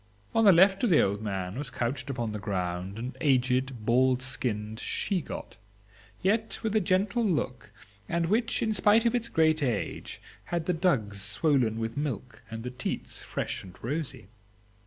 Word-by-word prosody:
On 225 -1 +4
the 200 - +9
left 190 +4 +5
of 240 - +4
the 165 - +6
old 100 +2 +1
man 95 +1 -3
was 145 -3 -3
couched 125 +1 -3
upon 120 -4 -2
the 105 - -4
ground 95 -1 -3
an 125 +3 -5
aged 130 -4 +1
bald 130 +2 +3
skinned 110 -4 -2
she 185 +7 -1
got, - - -8 0.7
yet 220 +4 +1
with 220 -1 -1
a - - +6
gentle 200 +6 +1
look, 150 - -1 0.4
and 170 0 +1
which, 230 +6 +1
in 220 -1 +1
spite 210 +3 +4
of 235 - +3
its 235 -2 -1
great 155 -1 +3
age, 120 -8 -2 0.3
had 170 -2 -2
the 180 - +1
dugs 120 - +1
swollen 115 - +1
with 115 +1 -3
milk 125 -5 -4
and 115 0 -6
the 125 - -4
teats 125 0 -4
fresh - - -3
and 95 -1 -12
rosy. 135 -5 -4
130 Hz, 175 wpm, -28 LUFS, 115-180 Hz, 0.7 s, the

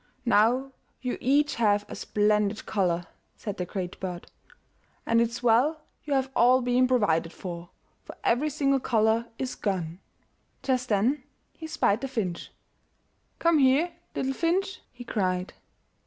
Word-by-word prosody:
"Now 245 +4 +3 0.3
you 250 - -2
each 290 +3 +3
have 205 -3 +2
a - - -7
splendid 210 0 +1
color," 175 -4 0 0.3
said 205 -2 -5
the 180 - -2
Great 180 -1 -5
Bird, 180 -2 -6 0.7
"and 230 0 +3
it's 235 +1 -2
well 250 +7 +3 0.3
you 290 -2 0
have 265 0 0
all 250 +2 +5
been 250 +1 +3
provided 170 -10 +2
for, 175 -1 -7 0.3
for - - -11
every 270 +6 +2
single 275 -2 +1
color 225 -1 +2
is 260 -1 -3
gone." 180 -4 -3 0.6
Just 255 -2 0
then 230 +7 +2 0.3
he 320 - -8
spied 220 -8 +1
the 270 - -2
finch. 210 -10 -3 0.9
"Come 335 -2 +3
here, 280 +6 +4 0.2
little 270 0 -1
finch," 360 +6 -1
he 245 0 -10
cried. 185 -5 -1
235 Hz, 140 wpm, -27 LUFS, 200-265 Hz, 0.9 s, all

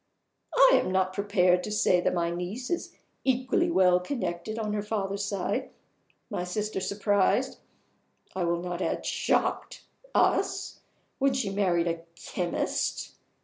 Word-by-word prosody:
I - - +7
am - - -3
not 185 0 +1
prepared 185 -3 +2
to - - -4
say 185 -4 +3
that - - +1
my 170 -1 0
niece 185 - -4
is 345 - -3 0.3
equally 260 +6 +1
well 180 - +4
connected 185 -1 -4
on 215 -2 -2
her 210 - -1
father's 200 -1 -2
side. 200 -2 -2 0.6
My 180 - -3
sister 210 +3 -2
surprised 200 0 +1 0.8
I 185 -2 0
will 170 0 0
not 180 0 -4
add - - -2
shocked - - 0 0.3
us - - +1 0.4
when 275 0 +3
she 230 -7 -1
married 180 -4 +1
a 165 0 -2
chemist. 175 +1 -2
195 Hz, 140 wpm, -28 LUFS, 180-215 Hz, 0.8 s, I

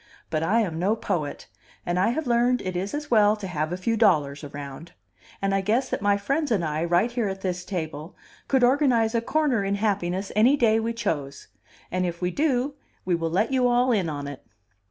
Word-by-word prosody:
But 155 -1 0
I 205 +8 +2
am 165 -7 -2
no 200 +5 +2
poet; 155 -9 -3 0.4
and 175 +1 0
I 190 - +3
have 305 +6 -2
learned 245 +1 +2
it 185 -1 -4
is 195 +8 -2
as 295 -2 -6
well 210 -2 +5
to 210 -2 -8
have 155 -3 -2
a 180 - -2
few 225 +5 0
dollars 155 -10 +2
around. 145 +2 -8 0.5
And 195 0 +1
I 195 - +2
guess 230 +7 0
that - - -2
my 205 0 +3
friends 275 +9 -1
and 200 -8 +1
I, 155 +1 -1
right 175 +7 +2
here 240 -3 -1
at 190 0 -5
this 180 -2 -3
table, 160 -3 -5 0.3
could 265 -2 +2
organize 245 -4 +3
a 230 - +1
corner 275 -4 +1
in 195 +1 0
happiness 195 -2 -1
any 245 +7 +5
day 225 -3 +3
we 230 +1 -2
chose. 150 - -4 0.4
And 185 +1 0
if 170 -1 -3
we 180 0 -1
do, 275 - 0 0.3
we 180 - +1
will 165 -1 0
let 195 +9 +1
you 255 -2 +3
all 245 +1 +3
in 195 -8 +1
on 145 -2 -4
it." 140 -2 -8
200 Hz, 215 wpm, -25 LUFS, 175-235 Hz, 0.5 s, well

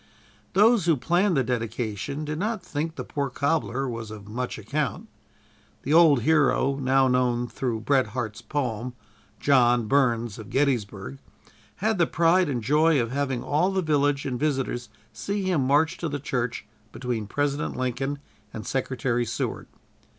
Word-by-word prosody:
Those 215 0 +5
who 165 -3 +4
planned 175 +5 +2
the 135 - +3
dedication 115 +2 -3
did 150 +1 -4
not 215 +1 -2
think 155 +2 -3
the - - -5
poor 140 -2 -3
cobbler 135 -1 -1
was 115 -3 -5
of 105 -2 -10
much 125 +4 -4
account. 130 +4 -3 0.8
The 145 - 0
old 155 -7 +6
hero, 145 -2 +3
now 135 0 +3
known 125 -1 +1
through 120 -3 -3
Bret 130 +1 +2
Harte's 110 -3 -4
poem, 125 -4 -3 0.5
"John 120 -4 +4
Burns 120 -5 +1
of 110 - -9
Gettysburg," 120 - -1 0.6
had 215 0 0
the 170 - +4
pride 170 +1 +3
and 125 -5 -2
joy 150 +4 +3
of 115 -1 -1
having 135 -3 -1
all 155 +6 +1
the 190 -1 0
village 145 -2 +1
and 125 -3 -2
visitors 135 -6 -1 0.2
see 200 0 -3
him 170 -9 +1
march 145 +4 +2
to 165 - -2
the 145 0 -3
church 125 -5 -3 0.3
between 120 -3 -3
President 145 +4 -1
Lincoln 130 +3 -2 0.3
and 110 -2 -7
Secretary 130 -2 -1
Seward. 120 - -3
135 Hz, 155 wpm, -25 LUFS, 120-150 Hz, 0.8 s, old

